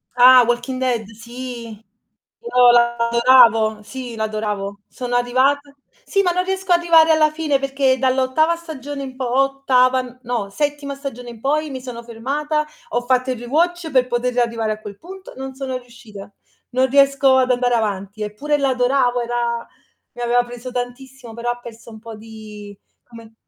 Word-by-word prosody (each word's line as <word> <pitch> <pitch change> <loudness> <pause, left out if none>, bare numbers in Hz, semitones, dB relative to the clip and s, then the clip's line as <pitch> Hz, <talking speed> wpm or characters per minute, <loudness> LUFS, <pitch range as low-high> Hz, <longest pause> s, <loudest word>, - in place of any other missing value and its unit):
Ah, 250 0 +8
"Walking 240 +2 -1
Dead", 245 -4 -1
sì. 235 -1 -9 0.6
No, 250 - +5
la 235 0 +3
adoravo. 235 -2 +4
Sì, 250 0 -8
l'adoravo. 210 -2 -3
Sono 245 -1 -5
arrivata 270 +4 +1 0.3
sì, 395 -3 +1
ma 355 - +2
non 365 +1 0
riesco 380 0 -3
ad 345 - +5
arrivare 325 -2 +5
alla 310 -1 +4
fine 305 -3 0
perché 270 -1 +1
dall'ottava 265 +5 +2
stagione 290 -4 -7
in 260 -1 -8
po 255 -2 -3
ottava 255 -2 +1
no, 235 -5 -3
settima 290 +4 -3
stagione 250 -3 -7
in 230 -2 -11
poi 300 +4 0
mi 260 -2 -6
sono 245 -2 -7
fermata, 290 +7 -2 0.2
ho 240 - -1
fatto 255 +1 0
il 250 - -3
rewatch 325 +6 -1
per 255 -1 +3
poter 245 0 -1
riarrivare 230 -3 0
a 215 0 -5
quel 205 -2 -9
punto, 380 +2 -12
non 265 0 -6
sono 260 -1 -4
riuscita. 230 -5 -13 0.4
Non 260 +1 +2
riesco 275 -1 +4
ad 255 -1 +2
andare 245 -1 +1
avanti. 205 -1 -3
Eppure 285 +9 -2
l'adoravo, 250 -2 +1
era 235 0 -2 0.5
mi 245 - -9
aveva 240 +1 +2
preso 245 +1 -9
tantissimo, 245 0 -7
però 240 +1 -2
ha 240 - -6
perso 230 -1 -12
un 220 - -11
po' 225 -1 -10
di 210 -2 -11 0.3
come 230 -2 -14
250 Hz, 165 wpm, -20 LUFS, 235-275 Hz, 0.6 s, Ah